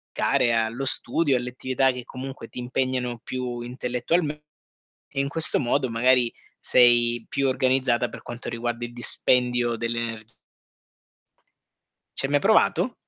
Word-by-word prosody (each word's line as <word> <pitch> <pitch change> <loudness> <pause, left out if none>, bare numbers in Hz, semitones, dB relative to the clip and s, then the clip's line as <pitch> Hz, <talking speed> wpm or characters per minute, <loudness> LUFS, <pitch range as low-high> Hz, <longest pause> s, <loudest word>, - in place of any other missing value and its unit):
care 120 - +2
allo 115 +3 -1
studio, 140 +1 0
alle 125 0 -4
attività 130 +1 +1
che 125 -1 -7
comunque 130 -1 -8
ti - - -8
impegnano 125 -1 -2
più 125 0 -5
intellettualm 125 +6 -1
e 150 0 -12 0.5
in 140 - -2
questo 160 +2 +1
modo 130 +1 0
magari 120 +1 +3 0.3
sei 120 -1 +4
più 140 0 0
organizzata 130 -2 +1
per - - -10
quanto 120 0 -7
riguarda 120 0 -3
il 120 - -9
dispendio 120 0 +2
delle 115 +1 -2
ener 115 -1 -6 1.8
Ci - - +3
hai 135 - -3
mai 145 - +4
provato? 220 - +3
125 Hz, 140 wpm, -24 LUFS, 120-135 Hz, 1.8 s, sei